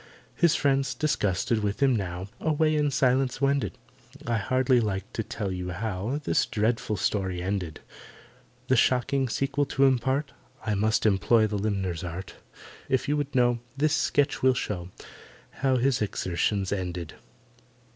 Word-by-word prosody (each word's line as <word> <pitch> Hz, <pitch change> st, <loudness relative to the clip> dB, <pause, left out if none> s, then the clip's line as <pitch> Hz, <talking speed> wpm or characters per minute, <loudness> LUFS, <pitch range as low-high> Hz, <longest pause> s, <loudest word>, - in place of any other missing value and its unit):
His 170 Hz, -1 st, +3 dB
friends, 135 Hz, -1 st, +1 dB
disgusted 110 Hz, -6 st, 0 dB
with 105 Hz, -1 st, -2 dB
him 135 Hz, -3 st, +4 dB
now, 95 Hz, -2 st, -3 dB
Away 155 Hz, 0 st, +1 dB
in 150 Hz, -1 st, +2 dB
silence 130 Hz, -1 st, +1 dB
wended— 140 Hz, -1 st, 0 dB, 0.5 s
I 115 Hz, -1 st, 0 dB
hardly 130 Hz, +4 st, +2 dB
like 105 Hz, -1 st, -3 dB
to -, -, -1 dB
tell 100 Hz, -2 st, -4 dB
you 90 Hz, -1 st, -4 dB
how 105 Hz, +7 st, -3 dB
This -, -, +1 dB
dreadful 110 Hz, 0 st, 0 dB
story 95 Hz, -2 st, -1 dB
ended. 90 Hz, -3 st, -3 dB, 0.9 s
The 130 Hz, -, +3 dB
shocking 130 Hz, +2 st, +2 dB
sequel 140 Hz, +4 st, 0 dB
to 135 Hz, -, +1 dB
impart, 135 Hz, +2 st, +1 dB, 0.3 s
I 110 Hz, -, 0 dB
must 110 Hz, +2 st, +1 dB
employ 110 Hz, +2 st, +4 dB
the 105 Hz, -1 st, -2 dB
limner's 95 Hz, -5 st, -2 dB
art— 90 Hz, +2 st, -6 dB, 0.6 s
If 130 Hz, -, +1 dB
you 145 Hz, -, +2 dB
would 145 Hz, -2 st, -3 dB
know, 120 Hz, -1 st, +3 dB, 0.2 s
This 150 Hz, +2 st, +2 dB
sketch 145 Hz, -2 st, +1 dB
will 130 Hz, 0 st, +4 dB
show 90 Hz, -7 st, -3 dB, 0.6 s
How 130 Hz, -1 st, +1 dB
his 130 Hz, 0 st, +1 dB
exertions 95 Hz, 0 st, -1 dB
ended. 90 Hz, -4 st, -3 dB
115 Hz, 145 wpm, -27 LUFS, 95-135 Hz, 0.9 s, him